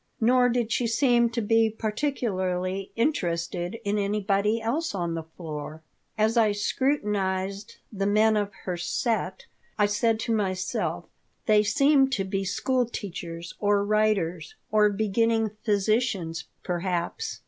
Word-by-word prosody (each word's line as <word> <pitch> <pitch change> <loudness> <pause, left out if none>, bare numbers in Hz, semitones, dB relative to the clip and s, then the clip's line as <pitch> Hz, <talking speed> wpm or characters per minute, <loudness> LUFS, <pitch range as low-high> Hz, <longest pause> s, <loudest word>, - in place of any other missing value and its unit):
Nor 245 +2 +4
did 235 -2 0
she 235 +2 +1
seem 235 0 +3
to 230 0 -2
be 225 +1 +3
particularly 195 -6 -2
interested 175 - -1
in 205 0 0
anybody 205 +1 +1
else 240 +4 -2
on 170 -3 -2
the 165 - -3
floor. 160 -1 -8 0.3
As 220 +2 +2
I 215 -3 +4
scrutinized 205 -4 -1 0.2
the 195 -1 -1
men 215 +2 +4
of 205 -1 0
her 180 -2 -2
"set" 190 +2 -2 0.3
I 210 - +4
said 220 +2 +1
to 230 - -1
myself: 190 -3 -1 0.4
"They 215 -1 +5
seem 270 +6 +4
to 195 - 0
be 195 0 -2
school 250 +6 0
teachers 170 -6 -6
or 205 -1 +2
writers, 200 -7 0 0.2
or 210 -1 +5
beginning 220 +2 +1
physicians, 205 -5 0 0.2
perhaps. 180 - -2
210 Hz, 130 wpm, -26 LUFS, 185-230 Hz, 0.4 s, They